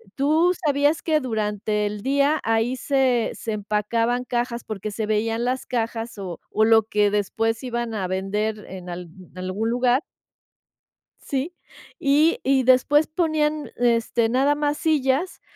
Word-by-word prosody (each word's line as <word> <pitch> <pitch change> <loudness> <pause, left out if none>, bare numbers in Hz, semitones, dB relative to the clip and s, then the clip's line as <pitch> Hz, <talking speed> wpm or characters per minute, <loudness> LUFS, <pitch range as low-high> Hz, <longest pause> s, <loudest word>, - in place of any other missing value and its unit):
Tú 315 +6 +3
sabías 290 +2 +2
que 315 -2 +2
durante 210 -4 -1
el 205 0 -4
día 280 +5 +2
ahí 225 +3 +1
se 260 -3 +1
se 225 - -5
empacaban 215 +4 0
cajas, 240 -1 -2
porque 215 -1 -5
se 215 +1 -3
veían 225 +2 0
las 255 +1 -2
cajas 230 -1 -3
o 185 -4 -6
o 220 - +2
lo 225 0 +5
que 210 -1 +2
después 225 +2 0
iban 240 -2 -3
a 195 -4 -2
vender 205 +3 -2
en 180 -1 -9
alg 175 0 -7 0.3
en - - -14
algún 185 +5 -2
lugar. 245 +2 +2 1.2
Sí. 280 +5 -3 0.5
Y 295 +4 +3
y 265 0 +3
después 260 +4 +4
ponían, 310 -2 0
l 240 -1 +3
este, 230 0 0
nada 270 +4 +2
más 295 0 -1
sillas 300 +2 0
235 Hz, 150 wpm, -23 LUFS, 215-275 Hz, 1.2 s, lo